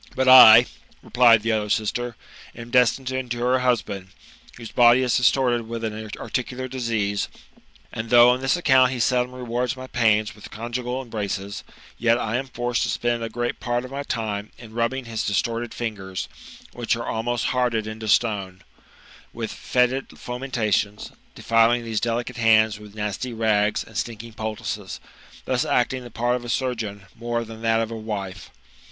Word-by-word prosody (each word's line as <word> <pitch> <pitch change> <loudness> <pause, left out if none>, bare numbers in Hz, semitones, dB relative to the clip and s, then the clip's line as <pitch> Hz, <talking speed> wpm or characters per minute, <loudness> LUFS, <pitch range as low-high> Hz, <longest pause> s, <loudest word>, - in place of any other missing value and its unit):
'' - - -21
But 130 0 0
Ii" 125 -2 +10 0.4
replied 115 -1 +5
the 115 - 0
other 105 -1 -1
sister, 115 +3 -1 0.2
" - - -19
am 115 0 -10
destined 125 +1 +3
to 130 0 -2
endure 125 0 0
a - - -3
husband, 105 -6 -1 0.5
whose 115 -2 -9
body 120 +1 +5
is 125 -2 +1
distorted 120 -2 +2
with 115 0 -5
an 110 0 -5
articular 130 +1 -4
disease; 115 -6 -2 0.7
and 110 -1 -5
though 120 0 +7
on 125 - 0
this 135 +6 +1
account 130 -6 +4
he 130 - -4
seldom 125 +1 +1
rewards 125 +1 -2
my 130 - -7
pain 110 -4 +2
with 105 - -12
conjugal 125 +3 -4
embraces, 105 -2 -4 0.4
yet 115 0 +3
I 115 0 -1
am 135 +1 -4
forced 120 -2 -2
to 115 - 0
spend 120 +1 -1
a 115 - -3
great 120 +2 -3
part 120 0 -2
of 130 - -10
my 140 +1 -4
time 110 -6 -4
in 115 -2 -12
rubbiiig 120 +3 -1
his 115 -1 -3
distorted 115 +3 -1
fingers, 100 -5 -5 0.5
which 120 -1 -1
are 115 - -5
ahnost 115 +1 -1
hardened 120 -4 0
into 110 0 -6
stone, 100 -4 0 0.7
with - - -5
foetid 125 +2 0
fomentations, 115 -5 -2 0.2
defHing 115 +1 +2
these 110 -2 -2
delicate 120 +2 -2
hands 110 -2 +4
with 105 0 -13
nasty 105 +4 -4
rags 110 -2 +1
and - - -17
stinking 115 0 -5
poultices; 110 0 -5 0.5
thus 125 -1 0
acting 125 +1 0
the 120 - -10
part 120 +2 0
of 125 - -5
a 120 - -7
surgeon 115 -7 -3
more 120 0 -3
than 110 0 -10
that 115 0 +2
of 115 0 -3
a - - -4
wife. 100 -4 -6
115 Hz, 175 wpm, -23 LUFS, 110-125 Hz, 0.7 s, Ii